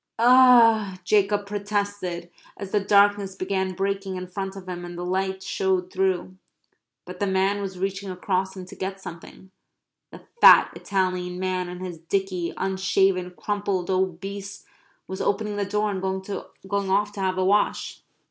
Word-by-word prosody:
"O 235 -4 +6
h," 185 - -13
Jacob 205 +1 +2
protested, 200 -4 -3 0.3
as 195 -1 -7
the 210 - +3
darkness 200 -1 +3
began 190 0 -2
breaking 195 0 -2
in 185 0 -5
front 195 +1 -5
of 190 -1 -10
him 175 -1 -5
and 175 0 -8
the 175 - -4
light 190 +1 -2
showed 185 -1 -1
through, 185 -1 -1 0.7
but 180 0 -9
the 200 - 0
man 195 +2 +1
was 190 -2 -5
reaching 195 +1 -3
across 190 +1 -2
him 185 - -7
to - - -12
get 195 +1 -5
something 185 +1 -11 0.6
the - - -12 0.2
fat - - +8
Italian 185 -2 -2
man 185 -1 -2
in 180 0 -8
his 180 -3 -6
dicky, 180 0 -2
unshaven, 190 -1 +1
crumpled, 200 -3 -2
obese, 195 +2 -3 0.4
was 190 +1 -5
opening 210 +1 -1
the 200 - 0
door 210 +1 0
and 190 -2 -4
going 190 +1 -4
off 205 +2 +2
to 205 - -9
have 185 -1 0
a 185 - +1
wash. 205 +2 +1
190 Hz, 160 wpm, -24 LUFS, 185-200 Hz, 0.7 s, fat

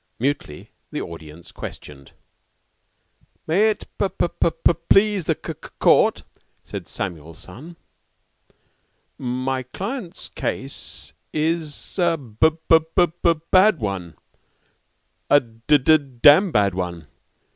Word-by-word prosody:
Mutely 125 - -3 0.2
the - - -3
audience 80 0 -9
questioned. 70 -2 -10 1.3
"May 200 +7 +3
it 215 - -3
p 200 - +1
p 170 -1 0 0.4
please 200 -3 +4
the - - 0
c - - -3 0.2
court," - - +4 0.4
said - - -8
Samuel 80 -4 -6
son, 140 - -12 1.4
"my 130 +1 -2
client's 190 - -6
case 135 +1 -4 0.2
is 160 +2 -2
a 170 -2 +2
b 130 +2 +2 0.2
b 165 - +7 0.2
b 175 -1 +3 0.2
bad 190 0 +6
one 95 - -4 1.1
a 145 - +7
d 115 +4 +1
d 155 +3 +5 0.3
amn 170 +6 +7
bad 100 -5 +2
one. 90 -3 -4
145 Hz, 105 wpm, -22 LUFS, -, 1.4 s, b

